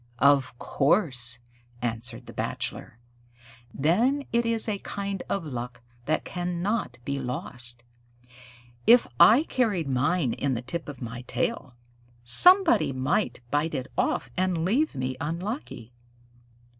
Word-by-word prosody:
"Of 140 -2 +3
course," 130 - +2 0.4
answered 115 0 -4
the - - -11
Bachelor. 115 - -4 0.7
"Then 230 - +1
it 235 0 +2
is 230 -1 +4
a 205 -2 -2
kind 200 -1 -5
of 195 -4 -2
luck 125 -4 -6 0.2
that 155 +2 -1
cannot 180 - -3
be 140 0 -2
lost. 125 -2 -5 1.0
If 240 +2 +7
I 235 +8 +7
carried 200 - -1
mine 135 +1 +1
in 135 -2 -1
the 120 - -5
tip 155 +5 -5
of 135 -3 -8
my 120 +1 -6
tail, 140 - -3 0.5
somebody 360 - +6
might 130 -1 -1
bite 150 +2 0
it 130 0 -5
off - - -1
and 180 -3 0
leave 265 - +1
me 130 -1 -3
unlucky." 165 - -5
145 Hz, 125 wpm, -26 LUFS, 125-200 Hz, 1.0 s, If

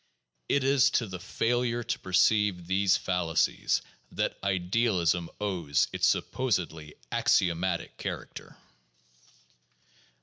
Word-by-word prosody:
It 140 - +2
is 135 0 +4
to 120 - -1
the 95 -3 -7
failure 120 +5 -1
to - - -3
perceive 95 0 +2
these 95 +1 +2
fallacies 85 -3 0 0.3
that - - -1
idealism 90 -3 +1
owes 90 -8 0
its - - +2
supposedly 85 -11 -1 0.2
axiomatic 85 0 +1
character. - - -7
95 Hz, 95 wpm, -28 LUFS, 85-115 Hz, 0.3 s, is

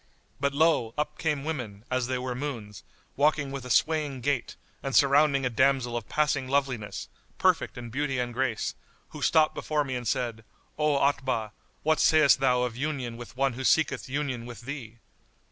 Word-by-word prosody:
But 140 0 0
lo! 150 -7 +2
up 150 0 -2
came 150 -4 0
women, 120 -9 -5
as 130 -1 0
they 130 0 -1
were 125 0 -3
moons, 120 -7 -6 0.3
walking 145 -1 +2
with 135 -2 -6
a - - -7
swaying 150 -1 +1
gait, 140 -1 -1 0.3
and 135 -1 -3
surrounding 140 -1 +4
a - - +2
damsel 130 -1 +2
of 115 -3 -4
passing 145 -3 +1
loveliness, 130 -8 -1 0.3
perfect - - +2
in 120 -1 -7
beauty 135 +1 -1
and 120 -1 -2
grace, 120 -3 -1 0.4
who - - -9
stopped 155 -1 +4
before 150 -1 -1
me 135 -2 -4
and 125 -2 -3
said, 115 -2 -1 0.3
'O 150 -2 +2
Otbah, 130 -6 0 0.3
what 155 0 +2
sayst 155 -4 +5
thou 125 -2 +3
of 125 -2 -2
union 135 -4 -3
with 120 +2 -10
one 135 -1 +2
who 130 +3 -5
seeketh 155 -1 +2
union 130 -4 -2
with 120 0 -9
thee? 120 -3 -7
135 Hz, 180 wpm, -27 LUFS, 120-145 Hz, 0.4 s, sayst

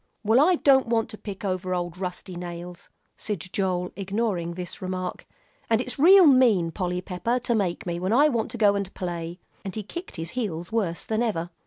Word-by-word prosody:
"Well, 220 +4 +4
I 355 +4 +5
don't 270 -5 +4
want 230 -1 +1
to 215 - -8
pick 200 -1 -7
over 185 -1 -1
old 175 -1 -3
rusty 180 0 -5
nails," 175 0 -8 0.3
said 210 -4 -3
Joel, 180 -2 -1
ignoring 195 -3 -2
this 180 -1 -6
remark, 185 -1 -4 0.4
"and 225 -1 +3
it's 250 +2 -3
real 370 +5 +8
mean, 240 - +5
Polly 180 0 -2
Pepper, 190 +7 -1
to 235 - 0
make 195 -6 -1
me, 170 -1 -3
when 185 +3 -1
I 280 +6 +6
want 235 -6 -1
to - - -7
go 205 -3 +5
and 200 -1 -3
play!" 175 -1 -5 0.2
And 195 - -6
he 215 - -3
kicked 345 - -8
his 165 -1 -5
heels 175 -8 -3
worse 195 -7 -1
than 220 +1 -1
ever. 175 -7 -1
195 Hz, 200 wpm, -25 LUFS, 175-230 Hz, 0.4 s, real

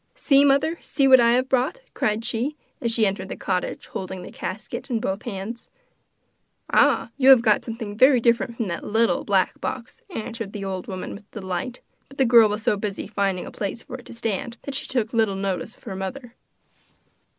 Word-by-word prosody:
'See, 280 -2 +4
mother, 285 +4 +3
see 275 -2 +1
what 260 -1 +8
I 235 0 +5
have 255 +1 +2
brought!' 265 - 0
cried 215 +1 -1
she, 240 +5 -1 0.3
as 235 - 0
she 225 -1 +3
entered 190 -1 -2
the - - -4
cottage 180 -2 -2
holding 185 -1 -6
the - - -9
casket 205 +8 -6
in 235 -3 0
both 195 -3 -2
hands. 225 +1 -6 1.0
'Ah! - - +3
you 270 -1 +5
have 260 -3 +8
got 215 -3 +3
something 225 -3 -6
very 260 +3 +6
different 235 0 +1
from 230 - -1
that 170 -2 -4
little 225 +2 +1
black - - +1
box,' 460 - -5
answered 225 - -5
the 200 -2 -5
old 190 -1 -4
woman 185 -2 -5
with 205 0 -12
delight. 190 +4 -5 0.3
But 275 - -15
the 265 - +4
girl 230 -2 +7
was 210 +1 -3
so 210 - +2
busy 200 -1 -4
finding 195 -3 -1
a - - -8
place 205 +3 -4
for - - -8
it - - -14
to - - -10
stand 230 +2 -3
that 280 - -5
she - - -2
took 235 -3 -1
little 220 -4 +2
notice 195 +3 -3
of - - -26
her 195 -5 -6
mother. 230 +6 -6
225 Hz, 205 wpm, -24 LUFS, 195-250 Hz, 1.0 s, what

